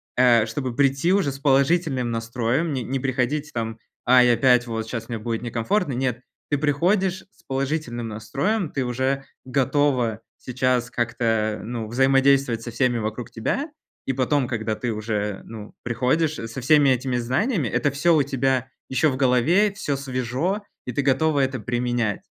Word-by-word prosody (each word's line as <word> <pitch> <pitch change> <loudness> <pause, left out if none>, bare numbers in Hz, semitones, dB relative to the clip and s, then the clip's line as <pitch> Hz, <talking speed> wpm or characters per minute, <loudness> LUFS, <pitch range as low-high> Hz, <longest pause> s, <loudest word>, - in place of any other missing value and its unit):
э, 120 -3 +5
чтобы 125 +2 -3
прийти 135 +5 +2
уже 195 -8 +2
с 135 - -10
положительным 140 -2 +2
настроем. 115 +7 -1
Не 130 -2 -2
не 135 +3 -2
приходить, 135 +3 -1
там: 115 -1 -3 0.3
"Ай, 125 -1 +6
опять, 125 0 +4
вот 115 -1 -3
щас 115 0 -5
мне 115 -2 -3
будет 115 +1 -3
некомфортно." 125 - 0
Нет, 125 -1 -1 0.3
ты 145 - +1
приходишь 180 +6 +1
с - - -27
положительным 135 -3 -2
настроем, 140 - -2
ты 135 -2 -2
уже 130 +2 -1 0.2
готова 130 -3 +1 0.2
сейчас 125 -1 0
как-то, 115 -2 0
ну, 115 0 -4
взаимодействовать 135 -1 +3
со 120 - -6
всеми 120 0 +1
вокруг 110 +2 -4
тебя, 270 - -2 0.4
и 135 - 0
потом, 130 +1 +1
когда 110 -2 -2
ты 120 +1 -3
уже, 105 -2 -3
ну, 110 -2 -10
приходишь 130 +7 +1
со 115 0 -6
всеми 145 +2 +5
этими 130 0 +1
знаниями, 130 - 0
это 120 +5 0
всё 165 +5 +3
у 150 - +4
тебя 135 -1 0 0.2
еще 130 +4 +2
в 130 - -3
голове, 140 - +3
всё 145 -9 -2
свежо, 135 - -2 0.2
и 125 - -4
ты 140 - 0
готова 140 +2 +2
это 135 -1 -1
применять. 120 -1 -1
130 Hz, 160 wpm, -23 LUFS, 120-140 Hz, 0.4 s, Ай